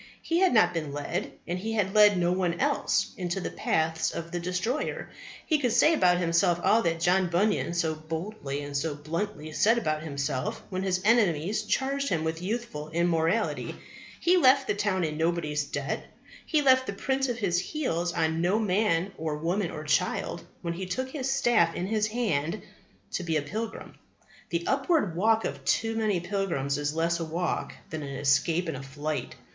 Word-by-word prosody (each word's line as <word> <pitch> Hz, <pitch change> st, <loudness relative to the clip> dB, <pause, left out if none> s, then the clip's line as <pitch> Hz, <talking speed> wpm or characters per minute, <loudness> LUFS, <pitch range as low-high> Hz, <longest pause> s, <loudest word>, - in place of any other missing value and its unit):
He 335 Hz, +1 st, +1 dB
had 375 Hz, 0 st, +4 dB
not 175 Hz, -7 st, +4 dB
been 155 Hz, -4 st, -3 dB
led, 145 Hz, +6 st, -3 dB, 0.2 s
and 175 Hz, +1 st, -2 dB
he 225 Hz, +4 st, -3 dB
had 200 Hz, -3 st, 0 dB
led 210 Hz, -2 st, +6 dB
no 175 Hz, 0 st, +2 dB
one 180 Hz, -2 st, 0 dB
else, -, -, +1 dB
into 180 Hz, 0 st, -2 dB
the -, -, -4 dB
paths 160 Hz, 0 st, 0 dB
of 170 Hz, 0 st, -6 dB
the 175 Hz, -, -2 dB
destroyer. 180 Hz, -, -2 dB, 0.3 s
He 310 Hz, -2 st, +2 dB
could 245 Hz, -5 st, +1 dB
say 300 Hz, +7 st, +5 dB
about 180 Hz, -, +4 dB
himself 175 Hz, 0 st, +2 dB
all 225 Hz, -, +4 dB
that 165 Hz, -3 st, 0 dB
John 180 Hz, +2 st, +3 dB
Bunyan 175 Hz, -1 st, +1 dB
so 160 Hz, -2 st, +1 dB
boldly 155 Hz, -2 st, -5 dB
and 145 Hz, 0 st, -7 dB
so 150 Hz, +1 st, -1 dB
bluntly 155 Hz, +2 st, -4 dB
said 225 Hz, +9 st, +3 dB
about 155 Hz, -9 st, -1 dB
himself 140 Hz, -3 st, -3 dB
when 185 Hz, 0 st, -2 dB
his 185 Hz, -1 st, 0 dB
enemies 210 Hz, -4 st, +3 dB
charged 275 Hz, +5 st, -1 dB
him 160 Hz, -2 st, 0 dB
with 160 Hz, +1 st, -2 dB
youthful 190 Hz, -7 st, -4 dB
immorality. 170 Hz, +5 st, 0 dB, 0.4 s
He 360 Hz, +2 st, +4 dB
left 270 Hz, -4 st, +5 dB
the -, -, 0 dB
town 205 Hz, -3 st, 0 dB
in 155 Hz, -2 st, -2 dB
nobody's 160 Hz, -3 st, 0 dB
debt. 140 Hz, -1 st, -3 dB, 0.4 s
He 305 Hz, -2 st, +2 dB
left 260 Hz, -1 st, +5 dB
the -, -, -2 dB
print 265 Hz, +5 st, -1 dB
of 240 Hz, -, -2 dB
his 185 Hz, -6 st, +1 dB
heels 180 Hz, -, -2 dB
on 160 Hz, -1 st, 0 dB
no 180 Hz, +5 st, +2 dB
man 195 Hz, -3 st, +1 dB
or 155 Hz, -1 st, -2 dB
woman 175 Hz, +4 st, -1 dB
or 155 Hz, -, -6 dB
child 155 Hz, 0 st, 0 dB, 0.2 s
when 170 Hz, -1 st, -2 dB
he 185 Hz, +2 st, -5 dB
took 260 Hz, +8 st, -3 dB
his 270 Hz, -3 st, -3 dB
staff 240 Hz, -11 st, +3 dB
in 175 Hz, -, -2 dB
his 215 Hz, +1 st, +1 dB
hand 210 Hz, -6 st, -1 dB, 0.5 s
to -, -, -2 dB
be 165 Hz, -2 st, 0 dB
a 145 Hz, -, -1 dB
pilgrim. 220 Hz, +9 st, -5 dB, 0.6 s
The 170 Hz, 0 st, -2 dB
upward 270 Hz, -, +1 dB
walk 220 Hz, +5 st, +3 dB
of -, -, -4 dB
too 225 Hz, 0 st, +1 dB
many 215 Hz, -4 st, +1 dB
pilgrims 170 Hz, -7 st, -1 dB
is 145 Hz, +1 st, -2 dB
less 165 Hz, +1 st, +1 dB
a -, -, -2 dB
walk 165 Hz, +2 st, -2 dB, 0.2 s
than 160 Hz, -1 st, -4 dB
an 140 Hz, -1 st, -6 dB
escape 155 Hz, +6 st, +2 dB
and 160 Hz, -, -3 dB
a -, -, -7 dB
flight. 145 Hz, +3 st, -4 dB
175 Hz, 190 wpm, -28 LUFS, 160-215 Hz, 0.6 s, led